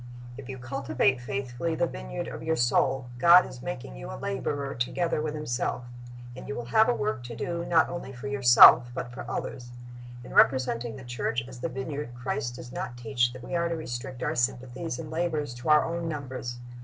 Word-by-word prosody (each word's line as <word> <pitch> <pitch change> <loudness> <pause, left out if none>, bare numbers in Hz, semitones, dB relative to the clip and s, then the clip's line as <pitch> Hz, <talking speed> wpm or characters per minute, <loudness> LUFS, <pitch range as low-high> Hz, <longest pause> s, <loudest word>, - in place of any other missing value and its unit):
"' - - -13
If 135 -1 -9
you 130 - -5
cultivate 130 0 0
faithfully 130 +5 -3
the 170 - +2
vineyard 60 - -5
of - - -7
your 160 0 0
soul, 130 +1 +2
God 175 +6 +8
is 125 - -10
making 125 - -6
you - - -8
a 60 - -6
laborer 140 - -3
together 150 +7 -1
with 155 0 -3
Himself 125 -4 -2 0.5
And 130 - -9
you 140 - -4
will 120 - -5
have 220 +1 +6
a - - +4
work 210 -11 -2
to 120 -1 -7
do 170 +7 -3
not 165 -2 +4
only 175 -6 -6
for 130 +1 -7
yourself, 120 -2 +8
but 120 - -4
for 130 +4 -8
others. 120 -1 -4 0.5
In - - -10
representing 125 -3 +3
the 135 - -10
church 120 -1 -2
as 125 -2 -10
the 170 - -2
vineyard, 130 -1 -5
Christ 120 0 -3
does 120 0 -9
not 120 - -5
teach 120 0 +1
that 130 -1 -10
we - - -4
are 170 0 +1
to 170 - -1
restrict 130 -4 -5
our - - 0
sympathies 125 +3 -2
and 155 +1 -7
labors 160 -5 -1
to 120 +5 -5
our 150 0 +6
own 165 0 -3
numbers. 130 -5 -5
130 Hz, 205 wpm, -28 LUFS, 120-155 Hz, 0.5 s, God